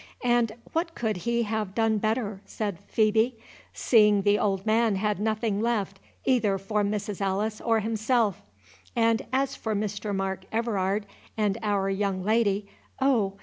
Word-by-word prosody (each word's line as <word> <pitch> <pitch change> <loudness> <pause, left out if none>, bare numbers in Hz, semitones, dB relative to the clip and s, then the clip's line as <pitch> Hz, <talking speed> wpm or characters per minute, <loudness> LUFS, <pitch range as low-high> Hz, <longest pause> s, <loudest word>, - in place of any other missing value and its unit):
—"And 240 -2 +2 0.2
what 330 0 -1
could 220 -2 -1
he 235 +6 0
have 215 -3 -3
done 225 -2 +2
better?" 215 -2 -1
said 200 -3 -4
Phœbe, 220 +3 +3 0.4
"seeing 210 -4 +4
the 205 +1 +3
old 195 -1 0
man 220 -1 +3
had 210 0 0
nothing 215 -1 0
left 205 -4 -1 0.3
either 225 -7 +2
for 205 +2 -1
Mrs. 205 0 -2
Alice 205 +3 -1
or 225 -1 +2
himself; 220 -1 +1 0.5
and 230 -1 +3
as 270 +1 0
for 220 -1 -3
Mr. 205 0 -3
Mark 190 -1 -2
Everard 210 -3 0 0.3
and 210 0 +1
our 205 -2 0
young 195 -1 -1
lady, 210 -1 +1 0.3
oh! 240 -8 +2
215 Hz, 145 wpm, -27 LUFS, 200-225 Hz, 0.5 s, seeing